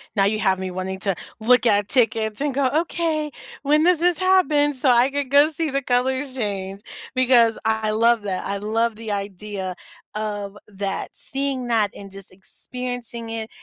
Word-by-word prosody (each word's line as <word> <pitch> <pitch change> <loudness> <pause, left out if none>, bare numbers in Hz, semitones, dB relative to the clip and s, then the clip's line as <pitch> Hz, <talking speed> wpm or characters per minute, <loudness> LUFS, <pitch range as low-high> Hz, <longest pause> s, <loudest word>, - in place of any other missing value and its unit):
now 195 -1 +3
you 215 +1 +1
have 190 -1 +2
me 185 -1 -4
wanting 190 +1 -4
to 195 -3 0 0.2
look 245 +2 +4
at 205 -2 +3
tickets 225 -3 +2
and 290 -2 0
go, 275 0 +1 0.2
"Okay, 320 -3 -2 0.3
when 300 +2 +3
does 355 -2 +4
this 350 -1 +2
happen?" 315 -6 +3
So 260 +1 +2
I 245 +2 +5
could 280 -2 -2
go 290 +2 +6
see 315 0 -2
the 275 0 0
colors 260 +2 0
change, 200 -4 -3 0.3
because 240 -3 +4
I 220 -1 +1
love 230 +1 +3
that, 190 -2 -3
I 200 0 -2
love 220 +2 0
the 220 -1 -6
idea 200 -2 -4 0.4
of 205 -1 -4
that, 195 -1 -4
seeing 275 -3 -1
that 220 -4 +2
and 200 -1 -10
just 195 -1 -8
experiencing 235 +4 -4
it, 225 0 -5
230 Hz, 175 wpm, -22 LUFS, 205-275 Hz, 0.4 s, go